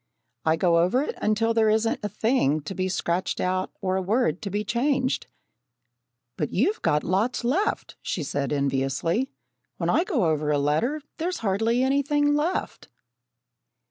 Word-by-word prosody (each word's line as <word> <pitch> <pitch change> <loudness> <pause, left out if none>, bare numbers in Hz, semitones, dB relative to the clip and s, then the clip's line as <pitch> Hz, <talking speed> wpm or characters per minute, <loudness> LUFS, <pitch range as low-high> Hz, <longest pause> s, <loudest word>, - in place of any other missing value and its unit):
"I 160 0 +4
go 170 0 +3
over 185 +11 +2
it - - -4
until 225 +2 +2
there 225 -1 +3
isn't 220 +1 +1
a 210 - -2
thing 205 - +1
to 195 - -6
be 185 0 -1
scratched 180 0 -1
out, 185 0 -1
or 185 0 0
a - - 0
word 190 -3 +1
to 205 - -4
be 205 +2 -1
changed." 260 +3 0 1.1
"But 150 - -2
you've 355 - +1
got 150 - +2
lots 215 +8 0
left," 345 - -1
she 165 - -3
said, 140 -1 -2
enviously. 140 - 0 0.5
"When - - 0
I 335 - +3
go 315 - 0
over 155 -2 0
a 150 - +3
letter 220 - 0 0.2
there's 355 +2 -1
hardly 225 +5 +2
anything 285 +2 +2
left." 305 +5 -2
210 Hz, 160 wpm, -25 LUFS, 170-260 Hz, 1.1 s, I